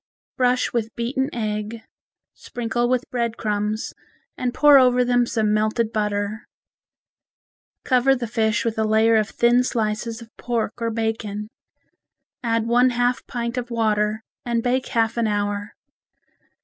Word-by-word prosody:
Brush 250 0 +1
with 225 -2 -2
beaten 265 +3 -1
egg, 215 0 -4 0.5
sprinkle 240 0 -2
with 255 -1 0
bread 235 -2 -1
crumbs 210 0 -2 0.4
and 250 -1 -2
pour 290 +1 +7
over 250 -1 +4
them 245 -1 +2
some 215 -3 +1
melted 215 +2 0
butter. 210 0 -2 1.4
Cover 260 +1 +3
the 245 -2 -3
fish 220 -1 0
with 225 -1 -1
a - - +2
layer 220 +1 +3
of 215 -1 +1
thin 240 +1 +3
slices 225 -1 -2
of 230 -1 -14
pork 230 -4 -2
or 230 - 0
bacon. 220 -2 -3 0.9
Add 230 -2 0
one 245 +2 +4
half 245 0 0
pint 235 0 -3
of 245 0 -7
water 215 -2 0 0.2
and 235 -2 -1
bake 255 +1 0
half 225 -1 0
an 230 -1 +1
hour. 205 0 -2
230 Hz, 140 wpm, -22 LUFS, 215-245 Hz, 1.4 s, pour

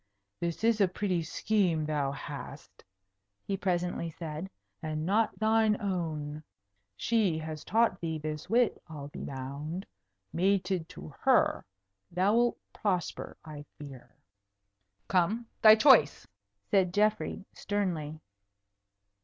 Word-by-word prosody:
"This 170 +3 -3
is 225 -2 +3
a 195 - +6
pretty 185 -1 -1
scheme 170 -1 0
thou 145 -3 0
hast," 140 - -9 0.6
he 195 - -1
presently 180 -3 -1
said. 160 +2 -6 0.3
"And 155 0 -3
not 215 +5 +1
thine 220 -1 +3
own. 160 -7 -3 0.6
She 215 -8 +1
has 155 -1 -6
taught 225 -3 +2
thee 160 -2 -2
this 155 0 -5
wit, 240 0 +2
I'll 145 -3 -8
be - - -8
bound. 140 +7 -5 0.5
Mated 185 -2 +1
to 75 - -10
her, - - +3 0.4
thou'lt 210 +7 +2 0.2
prosper, 185 -5 -2
I 150 -2 -8
fear." 140 -4 -11 0.9
"Come, 195 +6 +1 0.2
thy 215 -1 +10
choice," 225 - +5 0.5
said 185 -2 +3
Geoffrey, 210 -1 +1
sternly. 170 -7 -2
175 Hz, 110 wpm, -30 LUFS, 155-205 Hz, 0.9 s, thy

